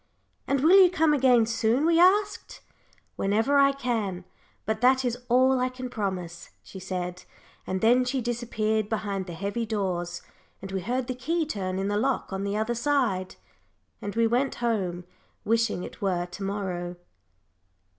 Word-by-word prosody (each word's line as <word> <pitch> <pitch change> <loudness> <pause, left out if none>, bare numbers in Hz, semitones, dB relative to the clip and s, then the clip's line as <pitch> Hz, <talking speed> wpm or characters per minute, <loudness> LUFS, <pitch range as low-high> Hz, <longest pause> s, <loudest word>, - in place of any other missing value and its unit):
"And 275 -1 +1
will 365 +6 +7
you 360 - +5
come 320 -4 +2
again 250 -5 +4
soon?" 230 +4 +1
we 335 0 +4
asked. 400 +3 +2 0.6
"Whenever 225 +8 +2
I 275 0 +6
can, 225 -9 -3 0.4
but 220 +1 -2
that 260 +1 +4
is 240 -1 0
all 260 +2 +4
I 255 0 +1
can 255 0 -7
promise," 185 -5 -4
she 190 - -10
said, 180 -1 -5 0.4
and 185 0 -2
then 245 +3 +4
she 255 +2 -1
disappeared 220 -3 -1
behind 200 -3 -3
the 175 - -6
heavy 200 +6 -3
doors, 185 -6 -3 0.4
and 195 0 -8
we 190 -1 -2
heard 245 +7 -2
the 255 - -3
key 320 +7 -1
turn 190 -10 -3
in 195 +1 -1
the 205 0 0
lock 260 -2 -1
on 190 +1 -3
the 200 +1 -2
other 220 +2 0
side. 235 -8 0 0.7
And 205 +1 -5
we 230 0 +3
went 245 +4 +1
home, 195 -7 -2 0.4
wishing 225 -4 +1
it - - -10
were 180 -3 0
to 180 +3 -11
morrow. 185 -3 -3
225 Hz, 165 wpm, -26 LUFS, 195-255 Hz, 0.7 s, will